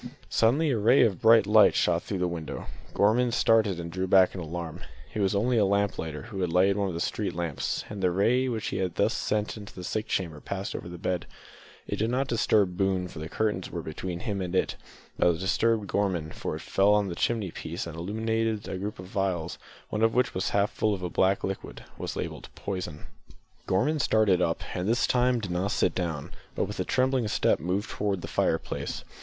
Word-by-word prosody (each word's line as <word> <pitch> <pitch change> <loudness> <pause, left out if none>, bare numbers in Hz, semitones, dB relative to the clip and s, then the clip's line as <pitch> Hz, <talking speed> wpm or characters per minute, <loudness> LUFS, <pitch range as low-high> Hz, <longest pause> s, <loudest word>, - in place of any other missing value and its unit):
Suddenly 140 +7 +3
a 115 - +1
ray 120 +6 +5
of 100 -6 +1
bright 110 -2 +7
light 105 +1 +6
shot 85 -1 +2
through 100 - -4
the 90 0 +1
window. 85 -2 -5 0.3
Gorman 120 +4 +3
started 110 -6 +3
and 85 0 -5
drew 95 +2 -2
back 95 0 +5
in 95 - -5
alarm. 85 0 -5 0.3
It - - -3
was 100 0 +2
only 115 +4 +2
a - - +4
lamp 100 0 +1
lighter 80 -2 -4
who 110 -4 -6
had 90 -2 0
lighted 95 +3 +4
one 100 -1 0
of 90 - -4
the - - -3
street 95 +1 -2
lamps, 85 -5 -2
and 105 -2 -6
the 90 - +3
ray 115 +8 +2
which 115 -3 -2
he - - -3
had 95 -3 -2
thus - - +2
sent 105 +1 -1
into 105 -1 -10
the 90 - -7
sick 110 +4 -2
chamber 85 -5 -2
passed 100 +5 -4
over 85 - -6
the 85 - -8
bed. 90 0 -2 0.6
It - - -3
did 110 +2 0
not 130 +2 0
disturb 105 -6 +2
Boone, 95 -2 0
for 80 - -9
the 80 +1 -6
curtains 105 -3 -1
were 85 -2 -5
between 85 +3 -5
him 105 -4 -2
and 90 0 -3
it, - - +1 0.4
but 85 -1 +4
it - - -8
disturbed 110 +3 +1
Gorman, 95 -6 -1
for - - -4
it - - -7
fell 100 +2 +3
on 105 -1 +2
the 90 - -3
chimney 105 0 -1
piece 85 +1 -5
and 85 -1 -7
illuminated 110 +4 -1
a 95 - -4
group 105 +3 -4
of 90 0 -9
phials, 95 -4 -2 0.3
one 105 - -2
of 115 0 +3
which, 125 0 +3 0.2
half 100 0 +1
full 105 -1 +1
of 95 - -8
a 90 - -3
black 95 +1 +2
liquid, 95 - -5 0.2
was - - -4
labelled - - -5
"Poison!" 90 -6 -5 0.6
Gorman 145 +12 +2
started 105 -8 +3
up, 85 -2 0
and 90 +3 -2
this 115 +1 +3
time 125 0 +2
did 100 -5 -5
not 90 +3 0
sit - - +1
down, 85 -6 -3 0.2
but - - +1
with - - -7
a - - 0
trembling 130 -2 +1
step - - +2
moved 95 +5 -2
to 100 -1 +1
the 90 - -7
fireplace. - - -1
100 Hz, 220 wpm, -27 LUFS, 90-110 Hz, 0.6 s, bright